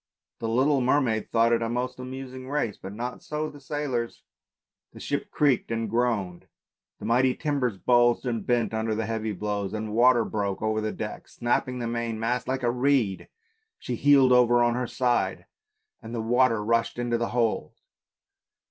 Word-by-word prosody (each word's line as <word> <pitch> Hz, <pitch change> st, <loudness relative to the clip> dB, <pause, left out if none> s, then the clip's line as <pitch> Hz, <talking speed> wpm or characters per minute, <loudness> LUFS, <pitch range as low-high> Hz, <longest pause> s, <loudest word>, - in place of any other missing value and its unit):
The 115 Hz, -, -3 dB
little 135 Hz, +4 st, +2 dB
mermaid 125 Hz, -4 st, +1 dB
thought 115 Hz, +1 st, +3 dB
it 115 Hz, -, +2 dB
a 115 Hz, -, -1 dB
most 125 Hz, +2 st, -3 dB
amusing 130 Hz, 0 st, -7 dB
race, 140 Hz, -8 st, -1 dB
but 95 Hz, -, -9 dB
not 120 Hz, +4 st, -5 dB
so 150 Hz, 0 st, -4 dB
the 145 Hz, -, -13 dB
sailors. 140 Hz, -6 st, -3 dB, 0.7 s
The -, -, -12 dB
ship -, -, -3 dB
creaked 140 Hz, -5 st, +1 dB
and 115 Hz, 0 st, -1 dB
groaned, 105 Hz, -6 st, -1 dB, 0.5 s
the -, -, -9 dB
mighty 125 Hz, +3 st, +3 dB
timbers 140 Hz, -9 st, -1 dB
bulged 120 Hz, +4 st, +3 dB
and 115 Hz, -3 st, -2 dB
bent 120 Hz, -2 st, 0 dB
under 110 Hz, 0 st, -1 dB
the 110 Hz, 0 st, -2 dB
heavy 110 Hz, 0 st, -2 dB
blows, 105 Hz, 0 st, -3 dB
the 110 Hz, -, -2 dB
water 120 Hz, +1 st, +4 dB
broke 100 Hz, -3 st, -2 dB
over 110 Hz, 0 st, 0 dB
the 110 Hz, 0 st, -2 dB
decks, 105 Hz, -1 st, -7 dB
snapping 125 Hz, +1 st, 0 dB
the 120 Hz, -, -3 dB
main 115 Hz, -1 st, -3 dB
mast 120 Hz, +2 st, -1 dB
like 130 Hz, 0 st, -2 dB
a 120 Hz, -, +2 dB
reed, 125 Hz, -6 st, +1 dB, 0.5 s
she 125 Hz, -, -5 dB
heeled 135 Hz, 0 st, +5 dB
over 120 Hz, -1 st, +5 dB
on 120 Hz, 0 st, +2 dB
her 125 Hz, 0 st, -2 dB
side 125 Hz, 0 st, 0 dB, 0.6 s
and 115 Hz, +2 st, -7 dB
the -, -, -2 dB
water 115 Hz, -2 st, +2 dB
rushed 115 Hz, +1 st, +1 dB
into 120 Hz, -1 st, -1 dB
the 120 Hz, -, -1 dB
hold. 120 Hz, -2 st, 0 dB
120 Hz, 175 wpm, -26 LUFS, 110-125 Hz, 0.7 s, heeled